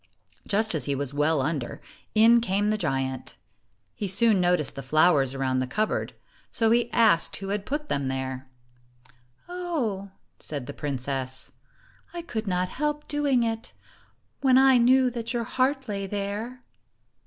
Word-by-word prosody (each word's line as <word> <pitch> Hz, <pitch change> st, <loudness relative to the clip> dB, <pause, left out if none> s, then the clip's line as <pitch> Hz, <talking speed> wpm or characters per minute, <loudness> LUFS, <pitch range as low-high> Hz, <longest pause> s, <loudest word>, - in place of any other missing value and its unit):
Just 215 Hz, 0 st, +2 dB
as 155 Hz, -6 st, -1 dB
he 140 Hz, -, -1 dB
was 140 Hz, 0 st, -4 dB
well 150 Hz, 0 st, +2 dB
under, 140 Hz, -4 st, -3 dB, 0.4 s
in 230 Hz, +2 st, +6 dB
came 205 Hz, -1 st, +1 dB
the 215 Hz, -, 0 dB
giant. 135 Hz, -5 st, -2 dB, 0.6 s
He 205 Hz, -, -4 dB
soon 205 Hz, +1 st, +3 dB
noticed 175 Hz, -5 st, +1 dB
the 135 Hz, -, -5 dB
flowers 140 Hz, -1 st, +3 dB
around 130 Hz, -1 st, 0 dB
the 130 Hz, -, -1 dB
cup 215 Hz, +10 st, 0 dB
board, -, -, -3 dB, 0.3 s
so 225 Hz, -1 st, +1 dB
he 235 Hz, 0 st, +3 dB
asked 215 Hz, -8 st, +3 dB
who 195 Hz, 0 st, -6 dB
had 205 Hz, 0 st, -3 dB
put 295 Hz, +2 st, -3 dB
them 140 Hz, -1 st, -1 dB
there. 130 Hz, 0 st, -4 dB, 1.0 s
"Oh," 305 Hz, -, -3 dB, 0.3 s
said 145 Hz, -4 st, -5 dB
the -, -, -7 dB
princess, 130 Hz, -2 st, -3 dB, 0.6 s
"I 345 Hz, -, -4 dB
could 225 Hz, -9 st, -4 dB
not 180 Hz, -1 st, 0 dB
help 295 Hz, +4 st, -2 dB
doing 285 Hz, -4 st, +1 dB
it, 225 Hz, 0 st, -3 dB, 0.7 s
when 260 Hz, -2 st, +4 dB
I 265 Hz, -1 st, +6 dB
knew 255 Hz, +1 st, +4 dB
that 235 Hz, 0 st, -4 dB
your 240 Hz, -1 st, -1 dB
heart 265 Hz, +3 st, 0 dB
lay 200 Hz, -2 st, -3 dB
there." 205 Hz, +6 st, -4 dB
200 Hz, 155 wpm, -26 LUFS, 140-240 Hz, 1.0 s, in